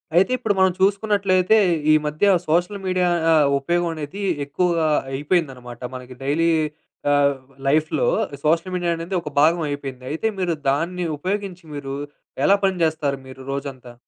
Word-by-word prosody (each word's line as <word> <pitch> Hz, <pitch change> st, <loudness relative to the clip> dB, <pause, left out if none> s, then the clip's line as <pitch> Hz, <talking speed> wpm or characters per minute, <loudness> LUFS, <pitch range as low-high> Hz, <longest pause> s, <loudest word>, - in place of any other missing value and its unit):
అయితే, 190 Hz, +7 st, +4 dB
ఇప్పుడు 215 Hz, -4 st, 0 dB
మనం 190 Hz, -1 st, +5 dB
చూసుకున్నట్లయితే, 200 Hz, 0 st, +3 dB, 0.3 s
ఈ -, -, +7 dB
మధ్య 150 Hz, +5 st, -3 dB, 0.2 s
సోషల్ 175 Hz, +6 st, +1 dB
మీడియా 185 Hz, -1 st, +1 dB, 0.2 s
ఆహ్, 155 Hz, -2 st, +5 dB
ఉపయోగం 170 Hz, +4 st, 0 dB
అనేది 155 Hz, +7 st, -6 dB, 0.2 s
ఎక్కువగా 165 Hz, +2 st, +1 dB, 0.3 s
అయిపోయిందన్నమాట. 135 Hz, -5 st, -2 dB
మనకి 125 Hz, 0 st, -9 dB
డైలీ 155 Hz, +5 st, +2 dB, 0.6 s
ఆహ్, 140 Hz, -1 st, +3 dB, 0.3 s
లైఫ్‌లో 155 Hz, -, +2 dB, 0.4 s
సోషల్ 165 Hz, +4 st, +1 dB
మీడియా 175 Hz, -1 st, 0 dB
అనేది 170 Hz, +3 st, -4 dB
ఒక 150 Hz, -, -6 dB
భాగం 165 Hz, +3 st, +4 dB
అయిపోయింది. 135 Hz, -3 st, -6 dB
అయితే, 160 Hz, +8 st, -1 dB
మీరు 175 Hz, -3 st, 0 dB
దాన్ని 170 Hz, +6 st, -1 dB
ఉపయోగించి 190 Hz, +2 st, -3 dB
మీరు, 135 Hz, -1 st, -5 dB, 0.5 s
ఎలా 200 Hz, -, +5 dB
పని 190 Hz, -1 st, +1 dB
చేస్తారు 145 Hz, -3 st, -1 dB
మీరు 130 Hz, 0 st, -11 dB
రోజంతా? 135 Hz, -3 st, -6 dB
165 Hz, 140 wpm, -22 LUFS, 140-185 Hz, 0.6 s, ఈ